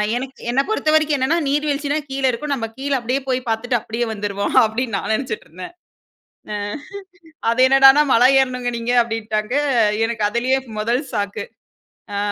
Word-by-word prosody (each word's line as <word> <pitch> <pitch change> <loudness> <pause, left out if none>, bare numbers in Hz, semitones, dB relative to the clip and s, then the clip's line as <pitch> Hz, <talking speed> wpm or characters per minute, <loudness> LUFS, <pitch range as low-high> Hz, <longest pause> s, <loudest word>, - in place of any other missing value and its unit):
எனக்கு 265 +2 -6
என்னை 255 +3 +2
பொறுத்தவரைக்கும் 310 -7 +2
என்னென்னா, 275 +6 +1
"நீர் 295 +2 0
வீழ்ச்சினா 290 0 -1
கீழ 270 0 -4
இருக்கும். 285 +4 -3
நம்ம 230 -4 -2
கீழ 280 +2 -4
அப்படியே 250 +3 -1
போய் 255 -1 +1
பார்த்துட்டு 240 +2 0
அப்படியே 230 +2 -3
வந்துருவோம்." 205 -1 -3
அப்படின்னு 230 +2 -2
நான் - - -5
நெனைச்சுட்டு 230 0 -3
இருந்தேன். 180 - -10 1.8
அது 235 +2 0
என்னடான்னா, 270 +2 +7
"மலை 245 +2 +6
ஏறணுங்க 250 -2 -1
நீங்க" 235 +1 -2
அப்படின்ட்டாங்க. 220 0 -3 0.5
எனக்கு 230 -2 -2
அதிலயே 250 +4 +1 0.2
1 235 +5 0
ஷாக்கு. 205 -2 -3 0.7
ஆ - - -1
245 Hz, 145 wpm, -20 LUFS, 225-270 Hz, 1.8 s, என்னடான்னா